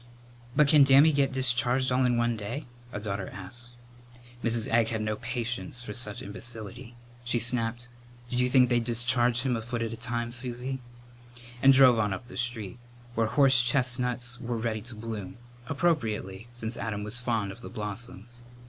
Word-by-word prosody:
"But 150 - +5
can 145 -1 +7
Dammy 140 +3 +6
get 140 -1 +2
discharged 130 0 +2
all 130 +1 +3
in 120 -1 +2
one 120 0 +1
day?" 110 +8 -5 0.3
a 105 - -4
daughter 100 -2 -4
asked. 120 +5 -3 0.7
Mrs. 115 -1 +1
Egg 115 0 +3
had 110 -1 -2
no 110 0 -1
patience 120 -1 -3
with 105 - -6
such 105 -4 -1
imbecility. 115 +3 -7 0.3
She 120 0 0
snapped, 120 0 +1 0.4
"Did 125 0 -1
you 125 0 +2
think 125 -1 +5
they'd 120 -1 +2
discharge 120 +1 +2
him 130 -2 +1
a 115 - -3
foot 115 0 -3
at 115 0 -3
a - - -4
time, 120 0 -3
Susie?" 125 +2 -2 0.8
and 135 - +7
drove 130 -3 +6
on 105 -2 +1
up 120 +4 -8
the - - -10
street, 120 -2 -3 0.3
where 115 -1 +1
horsechestnuts 125 -1 +2
were 120 0 -3
ready 110 -1 -2
to 120 +1 -8
bloom, 110 -3 -6 0.3
appropriately, 115 - -1
since 120 -1 -4
Adam 105 -2 -3
was 105 +3 0
fond 115 -5 -1
of 115 - -12
the - - -8
blossoms. 110 +2 -6
120 Hz, 175 wpm, -28 LUFS, 110-125 Hz, 0.8 s, can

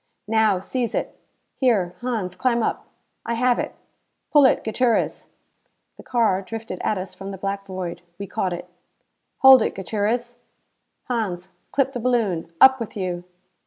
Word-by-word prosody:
"Now, 215 -3 +3
seize 240 +4 -2
it." - - -3 0.4
"Here, 205 -9 +2
Hans, 225 -7 -2
climb 235 +1 +1
up." - - -2 0.4
"I 235 - -2
have 245 +1 +2
it. - - -3 0.6
Pull 295 -2 +7
it, 260 - +3
Gutierrez!" 235 +1 0 0.7
The - - -12
car 225 -6 +1
drifted 220 -1 -6
at 215 - +1
us 185 0 -6
from 195 0 -8
the 195 - -6
black 195 +1 -4
void. 180 -2 -5 0.2
We 200 - -5
caught 185 -1 -2
it. 175 +1 -5 0.8
"Hold 265 -2 +10
it, - - -1
Gutierrez." 220 +5 -2 0.6
"Hans, 195 -7 -3 0.2
clip 270 -1 +1
the 245 - -3
balloon. 220 -9 0
Up 265 0 +8
with 230 -2 -6
you." 180 -2 -3
220 Hz, 155 wpm, -23 LUFS, 185-245 Hz, 0.8 s, Hold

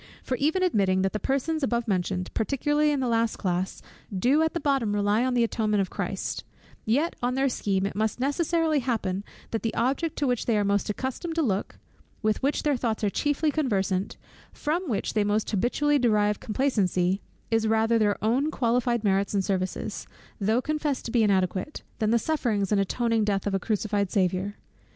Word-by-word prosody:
For 255 - -1
even 315 +8 +1
admitting 195 - +2
that 195 - 0
the 215 - -1
persons 280 +7 -1
above 240 -3 0
mentioned, 185 -2 -1
particularly 295 +5 +1
the 265 -2 -1
last 230 -1 +1
class, 185 -1 -2 0.3
do 250 +11 +2
at 320 +1 0
the - - +1
bottom 275 -8 +1
rely 205 +3 +2
on 255 -1 0
the 240 - +4
atonement 215 -2 0
of 190 - -3
Christ; - - -3 0.4
yet 285 +10 +1
on 245 +1 0
their 270 +1 +2
scheme, 195 -6 0
it 200 - -3
must 220 +3 -1
necessarily 315 +3 +1
happen, 205 -7 -1 0.3
that 225 - -1
the 225 - -2
object 275 +7 0
to 290 - -1
which 245 -3 0
they 230 -3 +3
are 205 - +2
most 200 +1 +1
accustomed 260 - -3
to 330 - +2
look, 200 -6 -1 0.5
with 215 0 +1
which 280 +2 0
their 295 -2 +2
thoughts 230 -3 -2
are 205 - +2
chiefly 295 +5 +1
conversant, 200 -10 -1 0.3
from 330 +3 -2
which 215 - -1
they 215 - +2
most 205 +1 0
habitually 280 +8 +2
derive 210 -4 +2
complacency, 195 -6 0 0.3
is 225 -1 +2
rather 225 +1 +3
their 205 -2 +2
own 255 +7 +2
qualified 240 -3 +1
merit 200 0 +1
and 195 -1 +1
services, 185 -1 -3 0.3
though 220 +5 +1
confessed 300 -2 -1
to 230 - -4
be 235 - +3
inadequate, 195 +5 0 0.2
than 215 -2 +1
the 235 - +4
sufferings 230 - 0
and 200 -1 +3
atoning 230 +2 +1
death 200 -2 0
of 200 - -1
a 195 - +1
crucified 205 -1 -1
Saviour. 190 0 0
225 Hz, 190 wpm, -26 LUFS, 200-275 Hz, 0.5 s, the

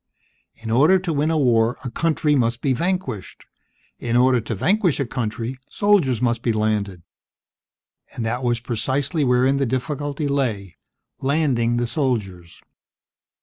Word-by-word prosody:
In 115 0 -7
order 150 +11 +5
to 180 -3 -3
win 150 +2 +1
a 165 - +1
war, 120 -4 +2
a 125 - -5
country 155 +1 +1
must 120 -3 +1
be 135 - +1
vanquished. 150 - -3 0.5
In 120 -1 -2
order 125 -1 +4
to 110 +1 -4
vanquish 180 - +1
a 140 - 0
country, 120 +1 -4
soldiers 165 - +2
must 120 -1 +1
be 120 - +1
landed. 105 -4 -1 1.1
And 115 - -3
that 120 +3 -2
was 120 -1 +1
precisely 135 +7 -1
wherein 130 +1 +3
the 135 -1 0
difficulty 145 +3 -2
lay: 115 - -2 0.4
landing 130 -5 +1
the 120 - 0
soldiers. 105 - -3
125 Hz, 145 wpm, -22 LUFS, 115-145 Hz, 1.1 s, order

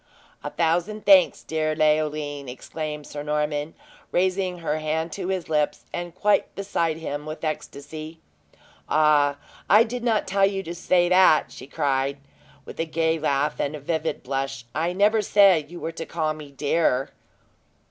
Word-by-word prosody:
"A - - -3
thousand 175 +6 -1
thanks, 190 -3 +5
dear 155 -1 -1
Leoline!" 150 -2 0
exclaimed 150 +3 -6
Sir 145 - -7
Norman, 150 +1 -2 0.4
raising 185 0 0
her 155 -2 -2
hand 160 +2 -2
to 185 0 -5
his 185 -2 -2
lips, 150 -2 0
and 175 0 -5
quite 210 +2 +1
beside 170 -5 -1
himself 150 -2 -5
with 155 +2 -7
ecstasy. 155 +1 -6 0.7
"Ah, 150 -2 +3 0.3
I 210 +3 +7
did 240 +1 -5
not 225 -3 +1
tell 195 0 +3
you 195 -1 -3
to 170 -1 -6
say 175 0 +2
that!" 180 -4 +5
she - - -10
cried, 140 -2 0 0.5
with - - -11
a 165 - +1
gay 160 0 0
laugh 145 0 0
and 145 +1 -1
vivid 160 +1 -3
blush. 135 -1 -3
"I 160 +5 0
never 205 +4 +3
said 190 -7 +4
you 175 0 -9
were 165 - -4
to 165 -1 -7
call 155 -2 -1
me 150 -2 -10
dear." 140 -2 0
160 Hz, 155 wpm, -24 LUFS, 150-180 Hz, 0.7 s, I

